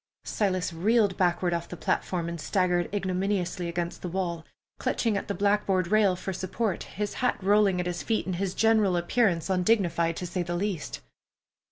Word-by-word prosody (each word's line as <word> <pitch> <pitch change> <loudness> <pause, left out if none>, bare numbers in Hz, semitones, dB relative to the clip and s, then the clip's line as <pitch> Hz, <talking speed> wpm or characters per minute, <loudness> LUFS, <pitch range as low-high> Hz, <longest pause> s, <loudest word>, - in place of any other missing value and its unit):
Silas 185 -4 -1
reeled 205 +3 +2
backward 175 -1 +1
off 170 0 -3
the 180 - -7
platform, 170 +1 -1
and 170 -1 -5
staggered 180 -2 +1
ignominiously 185 -2 -1
against 170 0 -3
the 180 - -4
wall, 170 -2 -2 0.4
clutching 225 -3 0
at 200 - -3
the 200 - -2
blackboard 200 -3 +1
rail 210 -3 +4
for 185 +1 -5
support, 185 +2 -2
his 210 -1 -4
hat 250 - +2
rolling 200 -1 +3
at 180 - -1
his 175 -1 -3
feet, 225 -2 -1
and 185 -2 -2
his 190 0 -2
general 215 -4 +3
appearance 175 -1 +1
undignified, 180 -3 +2
to 180 - -4
say 180 +1 -2
the 175 0 -3
least. 185 -3 -3
185 Hz, 175 wpm, -27 LUFS, 175-205 Hz, 0.4 s, rail